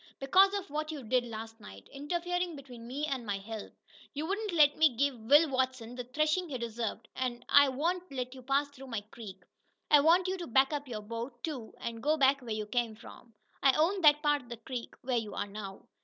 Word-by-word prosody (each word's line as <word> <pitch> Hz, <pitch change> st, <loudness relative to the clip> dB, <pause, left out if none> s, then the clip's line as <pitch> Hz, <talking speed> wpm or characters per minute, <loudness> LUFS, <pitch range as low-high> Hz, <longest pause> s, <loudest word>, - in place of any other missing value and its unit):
"Because 375 Hz, +9 st, +5 dB
of 390 Hz, -7 st, -5 dB
what 310 Hz, +1 st, -2 dB
you 295 Hz, -4 st, -6 dB
did 245 Hz, +2 st, +1 dB
last 225 Hz, 0 st, -8 dB
night 95 Hz, -, -12 dB
interferin' 350 Hz, +4 st, -2 dB
between 250 Hz, -4 st, -11 dB
me 280 Hz, +5 st, -3 dB
and 270 Hz, -5 st, -3 dB
my 205 Hz, -3 st, -2 dB
help. 215 Hz, +2 st, -7 dB, 0.4 s
You 300 Hz, +2 st, -2 dB
wouldn't 410 Hz, +4 st, -2 dB
let 300 Hz, -4 st, +5 dB
me 310 Hz, -6 st, +4 dB
give 280 Hz, +1 st, +2 dB
Will 290 Hz, +9 st, +5 dB
Watson 260 Hz, -3 st, -1 dB
the 250 Hz, 0 st, -5 dB
threshin' 305 Hz, +7 st, 0 dB
he 265 Hz, -, -3 dB
deserved, 230 Hz, -1 st, -4 dB
an' 245 Hz, -2 st, -3 dB
I 285 Hz, -1 st, +7 dB
won't 345 Hz, +6 st, -2 dB
let 255 Hz, -1 st, -4 dB
you 260 Hz, -, -11 dB
pass 275 Hz, +3 st, +1 dB
through 270 Hz, -1 st, -12 dB
my 230 Hz, -4 st, -3 dB
creek. 190 Hz, -5 st, -10 dB, 0.5 s
I 295 Hz, -, +9 dB
want 340 Hz, +5 st, +4 dB
you 375 Hz, +1 st, -1 dB
to 345 Hz, -, -5 dB
back 265 Hz, +4 st, +3 dB
up 290 Hz, -1 st, -3 dB
your 220 Hz, -4 st, -5 dB
boat, 230 Hz, +3 st, -6 dB
too, 265 Hz, -9 st, -5 dB
and 230 Hz, -1 st, -5 dB
go 305 Hz, +4 st, +2 dB
back 275 Hz, -1 st, +4 dB
where 245 Hz, -, -10 dB
you 215 Hz, -1 st, -2 dB
come 235 Hz, 0 st, -1 dB
from. 230 Hz, +1 st, -14 dB, 0.3 s
I 270 Hz, -1 st, +5 dB
own 360 Hz, +7 st, +2 dB
that 300 Hz, -1 st, +6 dB
part 295 Hz, -1 st, +2 dB
of 245 Hz, -, -18 dB
the 235 Hz, -, -6 dB
creek 240 Hz, +1 st, -7 dB
where 250 Hz, -1 st, 0 dB
you 220 Hz, -2 st, -3 dB
are -, -, -2 dB
now." 200 Hz, -1 st, -8 dB
265 Hz, 225 wpm, -31 LUFS, 230-300 Hz, 0.5 s, I